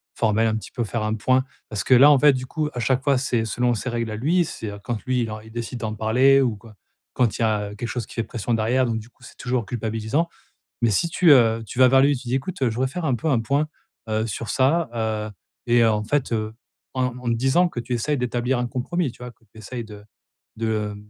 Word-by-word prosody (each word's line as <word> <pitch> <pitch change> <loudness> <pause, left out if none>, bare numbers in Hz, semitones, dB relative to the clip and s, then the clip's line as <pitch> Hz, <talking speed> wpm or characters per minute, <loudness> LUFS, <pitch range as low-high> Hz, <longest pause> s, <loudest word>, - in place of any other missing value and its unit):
formelle? 110 0 +2
Un 110 - 0
petit 110 - -6
peu 120 - -2
faire 115 +1 -3
un 110 +1 -1
point? 130 +4 +2 0.3
Parce 100 -3 -3
que 130 - +5
là, 140 +4 +8
en 140 - +5
fait, 145 0 +6
du 130 0 -3
coup 150 +2 -2
à 125 - -4
chaque 130 +2 +1
fois, 140 -2 +3
c'est 125 -4 0
selon 120 +2 0
ses 120 +3 -3
règles 115 -2 -2
à - - -4
lui. 165 +10 +2
C'est 115 - -7
heu, 100 - -8
quand 115 -3 -3
lui, 130 -1 +1
il 110 -2 -2
en 110 - -6
il 110 +1 -14
décide 120 +2 -5
d'en 110 -2 -3
parler 125 +6 +4
ou 120 -5 +1
quoi, 110 +1 -15 0.4
quand 115 -5 +1
il - - -4
y 115 - +4
a 105 -1 -1
quelque 120 +3 -4
chose 120 -2 -3
qui - - -14
fait 115 - 0
pression 115 +1 -3
derrière. 115 +4 +2
Donc 115 -1 -1
du 110 +2 -12
coup, 120 - -26
c'est - - -14
toujours 125 -2 -2
culpabilisant. 115 - -2 0.5
Mais 115 - +3
si 105 - +1
tu, 165 -1 +4
heu, 115 -4 +5
tu 115 +5 -7
vas 130 - +8
vers 135 +1 +5
lui, 140 +1 +4
tu 125 - -11
dis: 125 - 0
«Écoute, 135 +3 -4
heu, 125 - +3
je 110 - -5
voudrais 130 +2 +1
faire 175 +2 -4
un 135 - +2
peu 120 - -4
un 130 -5 +3
point, 140 +6 0 0.4
heu, 110 0 0
sur 115 +1 -5
ça», 145 +5 +2
heu 110 -2 -2 0.4
et 120 0 +4
heu, 115 - +5
en 105 -1 -1
fait, 135 +3 -1
heu, 110 0 -2 0.4
en 125 -1 -1
en - - -14
te 115 - +2
disant 135 +9 +3
que 120 - -5
tu 120 +1 -4
essayes 145 +5 0
d'établir 125 0 -1
un 125 - -1
compromis, 130 +5 -2
tu - - -21
vois? 125 - -7
Que 115 - -31
tu 110 - -21
essayes 120 +3 -6
de 105 -1 -12 0.5
de 110 -2 -2
120 Hz, 275 wpm, -23 LUFS, 110-130 Hz, 0.5 s, là